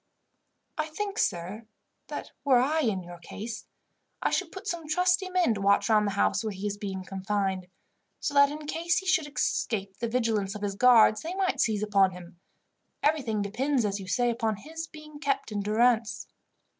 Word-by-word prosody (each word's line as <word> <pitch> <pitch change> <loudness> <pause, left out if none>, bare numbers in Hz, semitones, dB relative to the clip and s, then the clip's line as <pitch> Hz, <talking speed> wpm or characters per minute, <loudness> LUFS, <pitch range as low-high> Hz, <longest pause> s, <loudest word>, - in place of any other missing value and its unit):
"I 310 - 0
think, 400 +6 -4
sir, 195 +5 -2 0.4
that - - -6
were 270 -3 +5
I 285 +6 +2
in 215 -10 0
your 175 0 -10
case, 215 +5 -7 0.5
I - - 0
should - - -1
put 385 +1 -9
some 345 -6 -4
trusty 360 +4 +2
men 365 -10 +2
to 200 - -5
watch 200 +3 +3
round 210 -1 +4
the 200 - -1
house 205 +1 +1
where 220 - -1
he 195 +1 -6
is 205 -1 -1 0.3
confined; 190 -1 -2 0.5
so 290 - -2
that 280 0 +6
in 300 +1 -7
case 335 +3 0
he 385 - -2
should 355 -5 +2
escape 200 -8 -1
the 235 - -2
vigilance 220 -4 0
of 210 - -6
his 200 -1 -1
guards 220 -1 +6
they 340 +3 -5
might 380 -1 +1
seize 215 -2 +1
upon 195 -3 +3
him. 175 -1 -12 0.6
Everything 255 -9 +1
depends, 250 +5 0
as 200 0 -1
you 190 - -8
say, 240 +5 +2
upon 225 -2 -1
his 320 +9 -7
being 305 -1 -12
kept 275 -4 -1
in 205 - -2
durance." 220 +1 +2
230 Hz, 185 wpm, -28 LUFS, 200-305 Hz, 0.6 s, that